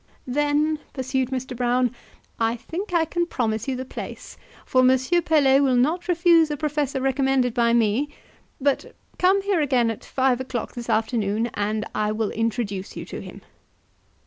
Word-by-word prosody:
"Then," 295 +3 +1
pursued 260 -1 -1
Mr. 260 -1 -4
Brown, 245 0 +1 0.5
"I 225 0 +1
think 360 - -6
I 335 -2 +3
can 345 +2 -1
promise 220 -7 -2
you 265 - -1
the 260 +1 -5
place, - - -8 0.3
for 255 - +3
Monsieur 260 +7 +3
Pelet 280 -4 +4
will 265 -3 +3
not 310 +9 +1
refuse 340 -2 +4
a 295 - -2
professor 290 -2 -1
recommended 265 -2 +1
by 235 -1 +2
me; 235 +5 +2 0.5
but 280 0 -1 0.2
come 385 +2 +3
here 390 -5 +1
again 250 -5 +2
at 225 - -8
five 260 -1 +1
o'clock 250 -2 -4
this 240 -1 -7
afternoon, 220 0 0
and 215 +1 -1
I 210 0 0
will 215 -1 -1
introduce 220 -4 -3
you - - -5
to - - -7
him." - - -11
260 Hz, 165 wpm, -24 LUFS, 235-295 Hz, 0.5 s, Pelet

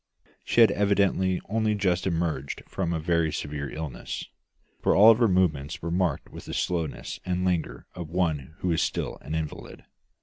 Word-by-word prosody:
She 120 - +3
had 110 -3 +7
evidently 100 -2 +2
only 110 +1 +1
just 95 -2 +1
emerged 80 -5 -2
from 90 -3 -2
a 85 - 0
very 85 -1 +1
severe 70 -1 -4
illness, 75 -4 -5 0.6
for - - +3
all 110 +4 +9
her 115 +1 +3
movements 85 -5 +1
were 85 - -2
marked 85 -5 0
by - - -8
the - - -7
slowness 85 -4 -2
and 90 0 -1
languor 90 -3 -1
of 85 -3 -7
one 80 -5 -1
who 90 - +1
is 80 - +2
still - - -2
an 80 - -5
invalid. 80 -2 -6
85 Hz, 170 wpm, -27 LUFS, 80-95 Hz, 0.6 s, all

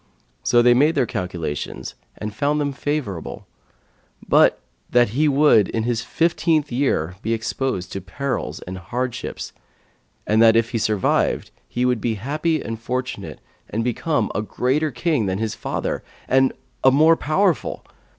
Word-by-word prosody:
So 120 - +4
they 120 0 +6
made 150 +6 +3
their 135 -4 +3
calculations 90 -7 -4 0.2
and 105 0 -5
found 145 +6 0
them 145 -1 -1
favourable; 135 - -4 0.8
but, - - +5 0.3
that 120 -3 +4
he 145 +8 +2
would, 140 -8 +5
in 110 - -1
his 120 -1 0
fifteenth 160 -1 +1
year, 95 - 0
be 115 - -1
exposed 110 -4 -3
to 95 - -4
perils 125 +9 -4
and 95 +1 -7
hardships, 125 +7 -4 0.7
and 110 +1 +3
that 115 -1 +7
if 115 0 +2
he 115 - -1
survived, 105 -2 +1 0.2
he 125 +1 -1
would 125 -3 +1
be 115 0 0
happy 155 - -1
and 115 0 -5
fortunate 125 +2 -4 0.3
and 115 +2 -1
become 125 0 0
a 105 - -1
greater 130 +8 0
king 135 - 0
than 95 0 -1
his 110 0 -2
father - - -3 0.3
and 130 0 +4 0.3
a 130 - +8
more 155 +5 +5
powerful. 160 - 0
125 Hz, 150 wpm, -22 LUFS, 110-145 Hz, 0.8 s, a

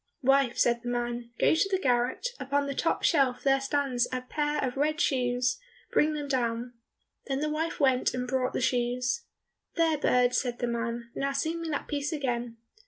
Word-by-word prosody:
"Wife," 270 -1 +3
said 235 -1 +2
the 245 - -4
man, 240 -1 -3
"go - - +4
to 330 +5 +2
the 385 - +2
garret, 255 - +1
upon 280 +2 0
the 280 - -3
top 330 - 0
shelf 270 -5 +2
there 270 -1 +3
stands 270 -3 0
a 255 0 -2
pair 295 +3 -1
of 255 -2 -2
red 300 +2 0
shoes, 250 - +1 0.3
bring 305 +1 +3
them 295 -1 -4
down." 240 -2 -1 0.5
Then 270 -1 -1
the 305 +1 -1
wife 320 +2 -2
went 260 -3 +3
and 250 0 -3
brought 255 0 0
the - - -1
shoes. 250 - 0 0.5
"There, 325 -3 +2
bird," 250 -3 +3
said 245 -2 0
the 245 - -1
man, 235 0 -3
"now 275 0 -1
sing 320 +4 -1
me 330 - -4
that 295 - -3
piece 290 +1 -2
again." 245 -6 -2
260 Hz, 190 wpm, -28 LUFS, 245-290 Hz, 0.5 s, go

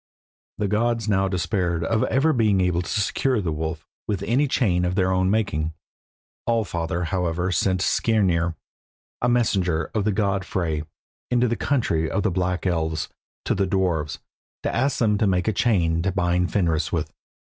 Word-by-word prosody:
The 105 - 0
gods 115 +2 0
now 95 -2 +2
despaired 90 -2 -1
of 110 +6 +1
ever 155 +4 +2
being 110 -5 +3
able 90 -1 +1
to 90 - -7
secure 110 +5 +1
the 90 -5 -2
wolf 80 +1 -4 0.2
with 100 -2 -2
any 125 +8 +2
chain 95 -9 +1
of 90 0 0
their 95 -2 +2
own 95 0 +2
making. 80 -7 0 0.7
All 115 -1 +2
father, 85 -1 -2
however, 90 +1 -1
sent 95 0 +1
Skirnir, 90 -7 +1 0.7
the 120 - +2
messenger 95 -9 +1
of 110 - 0
the 105 - +1
god 100 -2 0
Frey, 85 -5 -2 0.5
into 125 0 +2
the 120 - 0
country 85 - 0
of 100 - -1
the 105 - +1
Black 90 +1 -1
Elves, 80 -3 -1 0.4
to - - +1
the 95 0 0
dwarfs, 90 -5 0 0.5
to - - -1
ask 135 +3 +1
them 105 -3 +2
to 105 - +2
make 90 0 +1
a 110 - +2
chain 85 -7 +2
to 95 +3 0
bind 90 -2 +1
Fenris 85 -5 +1
with. 80 -2 -2
95 Hz, 175 wpm, -24 LUFS, 85-110 Hz, 0.7 s, being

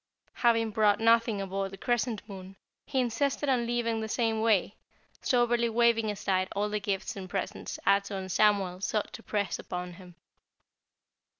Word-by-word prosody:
Having 230 -2 +3
brought 210 -1 +3
nothing 230 -1 +3
aboard 195 0 -3
the 195 - -10
Crescent 235 -1 -1
Moon, 190 -2 -10 0.3
he 265 - 0
insisted 275 +4 0
on 245 -3 +1
leaving 235 -1 0
in - - -3
the 220 - -3
same 225 -1 0
way, 215 -3 +2 0.5
soberly 240 -1 +2
waving 230 -1 +3
aside 190 -2 0
all 205 +1 0
the 210 0 -1
gifts 200 -1 -3
and 190 -2 -7
presents 195 0 -4
Ato 200 0 +2
and 190 -1 -5
Samuel 195 -3 +2
sought 210 +1 -2
to - - -8
press 205 -3 -2
upon 180 0 -5
him. 180 -1 -14
210 Hz, 165 wpm, -29 LUFS, 195-230 Hz, 0.5 s, Having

